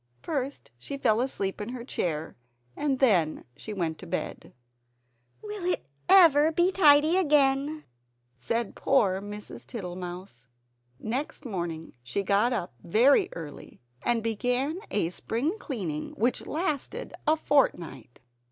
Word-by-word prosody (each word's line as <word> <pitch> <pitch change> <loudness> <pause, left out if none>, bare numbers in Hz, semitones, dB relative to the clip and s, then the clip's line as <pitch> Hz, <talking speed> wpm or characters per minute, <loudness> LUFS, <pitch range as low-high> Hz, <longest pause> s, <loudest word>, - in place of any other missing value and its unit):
First 280 - -4
she 275 - -6
fell 225 -4 +2
asleep 200 -7 -2
in 210 - -4
her 245 -1 -6
chair, 160 - -3 0.4
and 285 -3 0
then 185 - +2
she 220 - -8
went 170 -6 -2
to - - -10
bed. - - -4 0.9
"Will 420 -3 -6
it 360 - 0 0.2
ever 320 -5 +7
be 345 +3 +3
tidy 310 -1 +5
again?" 295 -2 +2 0.5
said 230 - -2
poor 200 -9 +2
Mrs. 205 +1 -8
Tittlemouse. 180 - -7 0.5
Next 260 - -4
morning 170 -7 -4
she 125 +11 -3
got 205 +5 +2
up 205 - -2
very 275 - +4
early 155 -4 -9 0.2
and 235 -2 +1
began 250 - 0
a 175 -5 0
spring 280 - -2
cleaning 180 - -4
which 240 +3 0
lasted 310 -4 -3
a 310 - +5
fort 290 -3 +3
night. 135 -8 -11
235 Hz, 130 wpm, -28 LUFS, 185-290 Hz, 0.9 s, ever